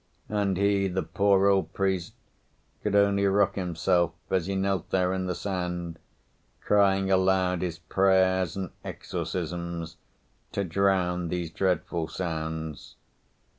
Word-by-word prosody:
And 100 Hz, -3 st, 0 dB
he, 100 Hz, 0 st, +2 dB
the 95 Hz, 0 st, -1 dB
poor 100 Hz, -1 st, +3 dB
old 95 Hz, -4 st, +2 dB
priest, 95 Hz, -3 st, -1 dB, 0.7 s
could 105 Hz, -1 st, -1 dB
only 100 Hz, -1 st, +4 dB
rock 100 Hz, 0 st, +3 dB
himself 85 Hz, -2 st, +1 dB, 0.2 s
as 95 Hz, -2 st, +1 dB
he 100 Hz, -, -1 dB
knelt 95 Hz, 0 st, -1 dB
there 90 Hz, -1 st, +1 dB
in 95 Hz, -1 st, -2 dB
the 90 Hz, -, -2 dB
sand, 90 Hz, -4 st, -4 dB, 0.6 s
crying 95 Hz, -1 st, +3 dB
aloud 95 Hz, -1 st, +2 dB
his 90 Hz, -2 st, -3 dB
prayers 95 Hz, 0 st, +2 dB
and 95 Hz, -3 st, -4 dB
exorcisms 85 Hz, -2 st, -4 dB, 0.6 s
to 100 Hz, -, 0 dB
drown 90 Hz, -1 st, +1 dB
these 85 Hz, -1 st, -3 dB
dreadful 90 Hz, -3 st, -1 dB
sounds. 80 Hz, -3 st, -5 dB
95 Hz, 125 wpm, -27 LUFS, 85-95 Hz, 0.7 s, only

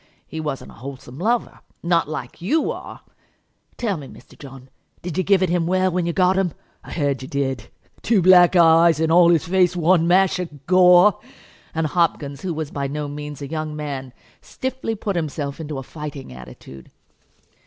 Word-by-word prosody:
He 160 Hz, -, -7 dB
wasn't 150 Hz, -4 st, -5 dB
a -, -, -17 dB
wholesome 130 Hz, 0 st, -9 dB
lover, 235 Hz, +6 st, -1 dB, 0.2 s
not 170 Hz, -3 st, +1 dB
like 150 Hz, -1 st, -7 dB
you 295 Hz, -, 0 dB
are. -, -, -9 dB, 0.8 s
Tell 210 Hz, -7 st, -1 dB
me, 140 Hz, -3 st, -9 dB
Mr. -, -, -16 dB
John, 135 Hz, -2 st, -13 dB, 0.3 s
did 175 Hz, -2 st, -5 dB
you 185 Hz, -, 0 dB
give 195 Hz, 0 st, +3 dB
it 185 Hz, -, +1 dB
him 170 Hz, -1 st, 0 dB
well 185 Hz, +1 st, +1 dB
when 175 Hz, -1 st, -1 dB
you -, -, 0 dB
got 185 Hz, +1 st, +2 dB
him? 180 Hz, -4 st, -1 dB, 0.3 s
I -, -, -12 dB
heard 140 Hz, -5 st, -1 dB
you 130 Hz, -, -7 dB
did; 135 Hz, -5 st, -3 dB, 0.3 s
two 220 Hz, -2 st, +2 dB
black 180 Hz, 0 st, +6 dB
eyes, 165 Hz, -1 st, +5 dB
and 160 Hz, 0 st, +1 dB
all 170 Hz, 0 st, +6 dB
his 170 Hz, -3 st, +3 dB
face 180 Hz, 0 st, +2 dB
one 170 Hz, 0 st, +3 dB
mash 185 Hz, +1 st, +3 dB
of 150 Hz, -6 st, -7 dB
gore!" 180 Hz, +2 st, +5 dB, 0.6 s
And 160 Hz, 0 st, 0 dB
Hopkins, 150 Hz, -4 st, -1 dB
who 185 Hz, -, -3 dB
was 155 Hz, -2 st, -4 dB
by 140 Hz, -1 st, -3 dB
no 150 Hz, +1 st, -4 dB
means 145 Hz, 0 st, -7 dB
a -, -, -5 dB
young 155 Hz, 0 st, -4 dB
man, 140 Hz, -4 st, -5 dB, 0.3 s
stiffly 260 Hz, -3 st, -4 dB
put 200 Hz, -2 st, -3 dB
himself 150 Hz, -3 st, -3 dB
into 155 Hz, -3 st, -5 dB
a 135 Hz, -, -5 dB
fighting 145 Hz, -, -8 dB
attitude. 65 Hz, +1 st, -12 dB
160 Hz, 185 wpm, -21 LUFS, 140-180 Hz, 0.8 s, black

